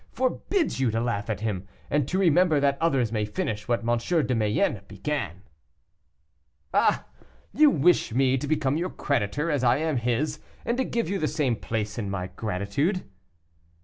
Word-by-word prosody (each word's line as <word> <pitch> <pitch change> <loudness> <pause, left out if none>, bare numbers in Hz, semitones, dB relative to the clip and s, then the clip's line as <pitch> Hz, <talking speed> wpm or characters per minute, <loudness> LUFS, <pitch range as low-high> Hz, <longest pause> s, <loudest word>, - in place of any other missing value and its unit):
forbids 260 - 0
you 130 -3 +2
to 115 +1 0
laugh 115 -3 -2
at 105 -1 -2
him, 100 -4 -3 0.2
and 145 -2 +1
to 185 - -1
remember 175 -3 +4
that 140 0 +2
others 135 -9 +2
may 110 -2 0
finish 105 0 -3
what 120 -1 0
M. 120 0 +3 0.3
de 125 - 0
Mayenne 105 -2 +1
began." 100 - -4 1.3
"Ah! - - +3 0.5
you 300 +1 +6
wish 175 - +3
me 130 +2 +3
to 135 +2 -3
become 150 -1 +1
your 180 +3 -1
creditor, 140 - -1
as 145 -4 0
I 120 +1 +4
am 155 -2 0
his, 125 +6 -1 0.3
and 235 - 0
to - - +3
give 235 -5 -1
you 195 +2 -1
the 155 - +1
same 150 -6 0
place 105 -1 -3
in 100 -3 -3
my 95 -2 -4
gratitude." 110 - -1
130 Hz, 175 wpm, -26 LUFS, 110-155 Hz, 1.3 s, you